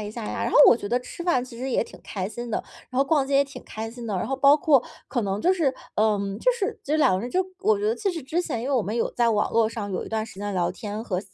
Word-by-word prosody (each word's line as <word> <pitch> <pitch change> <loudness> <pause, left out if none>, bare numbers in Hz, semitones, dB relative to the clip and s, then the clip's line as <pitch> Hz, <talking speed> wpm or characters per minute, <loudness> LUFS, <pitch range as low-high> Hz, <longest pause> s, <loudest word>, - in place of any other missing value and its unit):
一 210 - -5
下 230 -2 -6
呀。 - - -3
然 - - -2
后 - - +4
我 - - +7
觉 205 - -6
得 245 +3 +1
吃 340 +7 -8
饭， 255 -9 +2
其 240 -2 -11
实 265 +2 -3
也 - - +1
挺 - - -13
开 190 -1 -4
心 235 +1 -6
的， - - 0 0.3
然 255 - -8
后 270 - +5
逛 280 -1 +2
街 275 - -1
也 280 - +4
挺 275 - -10
开 220 +1 -6
心 235 -1 -8
的， 210 - -2
然 180 - -2
后 270 - -1
包 280 +2 +6
括 300 -6 +4 0.3
可 245 -2 -1
能 200 0 -2
就 365 - +4
是， 310 -8 +1 0.2
嗯， 205 -2 +1
就 - - +3
是 415 -5 -3
就 295 - 0
是 - - +2
两 290 - +5
个 185 - -2
人 240 - -4
就 370 +7 +1
我 420 +2 +3
觉 410 - -3
得 455 - 0
其 400 -4 -1
实 330 - -5
之 315 +7 -1
前 255 -10 -3
因 265 - -3
为 - - 0
我 255 - +3
们 210 +1 -3
有 235 - 0
在 235 -1 +2
网 210 -1 +1
络 225 -1 +3
上， 210 -3 -5
有 185 - -3
一 - - -9
段 220 -1 -1
时 210 -4 -12
间 205 0 -3
聊 180 -2 +1
天 215 -1 -6
和 185 -5 -2
240 Hz, 355 characters per minute, -25 LUFS, 215-285 Hz, 0.3 s, 我